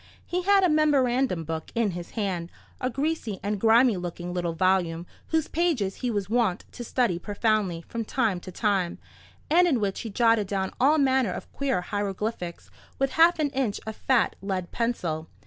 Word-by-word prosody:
He 360 +1 -1
had 395 +1 +4
a - - +6
memorandum 265 - +2
book 160 0 -5
in 230 -4 +1
his 175 -1 -7
hand—a 190 +4 -4
greasy 270 -6 -2
and 205 -1 -2
grimy 230 -1 +5
looking 175 0 -5
little 175 -2 -1
volume, 175 -1 +1 0.2
whose 320 -2 0
pages 300 - 0
he 250 - -2
was 205 -4 -1
wont 220 -4 0
to 240 - -7
study 230 -7 0
profoundly 205 -4 0
from 230 -1 -3
time 220 -7 0
to 185 - -9
time, 190 -3 0 0.5
and 350 +4 +5
in 275 -8 +2
which 200 -2 -1
he 225 - -5
jotted 225 -1 +3
down 190 -1 -2
all 285 +5 +4
manner 265 -6 +2
of - - -8
queer 270 -8 0
hieroglyphics 200 -2 -4 0.3
with 270 0 0
half 335 +2 +5
an 300 -3 0
inch 260 -7 -1
of 220 0 -5
fat 260 -4 +1
lead 190 -2 -3
pencil. 170 -10 -2
215 Hz, 175 wpm, -26 LUFS, 185-260 Hz, 0.5 s, a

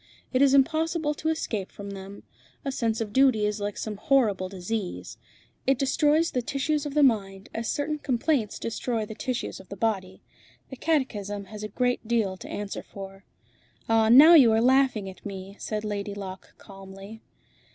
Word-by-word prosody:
It 255 - +3
is 275 -1 +5
impossible 315 +2 +2
to 315 +2 -3
escape 220 -11 -3
from 200 0 -8
them. 195 0 -9 0.4
A 275 - -1
sense 230 -4 -1
of 210 -2 -4
duty 260 -5 +4
is 210 0 -1
like 205 0 -3
some 215 -2 -4
horrible 210 -7 +2
disease. 190 +1 -5 0.5
It 270 -1 +4
destroys 300 +4 +2
the 250 - 0
tissues 295 +3 -1
of 285 - -7
the 300 - +5
mind, 195 -6 +1
as 225 0 -3
certain 300 +1 -2
complaints 255 -4 0
destroy 230 -1 -2
the 220 - -8
tissues 250 +2 -4
of 190 - -15
the 200 - -6
body. 190 -4 -2 0.5
The - - -6
catechism 210 -10 -1
has 210 - -7
a 210 - -4
great 245 +2 -1
deal 220 -5 +1
to - - -10
answer 205 -1 -5
for." 195 0 -11 0.6
"Ah! 225 -1 +3
now 290 +8 +9
you 265 -9 +8
are 220 - +3
laughing 255 -4 +3
at 190 - -11
me," 195 -1 -7
said 215 0 -4
Lady 205 -1 -3
Locke 190 -2 -8
calmly. 195 +2 -12
225 Hz, 175 wpm, -26 LUFS, 200-270 Hz, 0.6 s, now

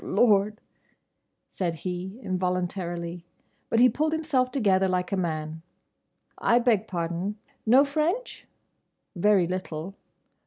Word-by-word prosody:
"Oh - - -11
Lord!" 210 -2 +3 0.9
said 175 -3 -2
he 185 +4 -4
involuntarily. 180 -2 -2 0.5
But 230 - +2
he 250 - +8
pulled 310 +6 0
himself 300 -6 +1
together 195 -7 +2
like 180 0 -1
a - - +1
man. 160 -3 -3 0.8
"I 235 - +4
beg 230 -4 +2
pardon!—Know 205 +10 0
French? 315 - -2 0.7
Very 195 0 +4
little. 180 -1 -4
195 Hz, 110 wpm, -26 LUFS, 175-245 Hz, 0.9 s, he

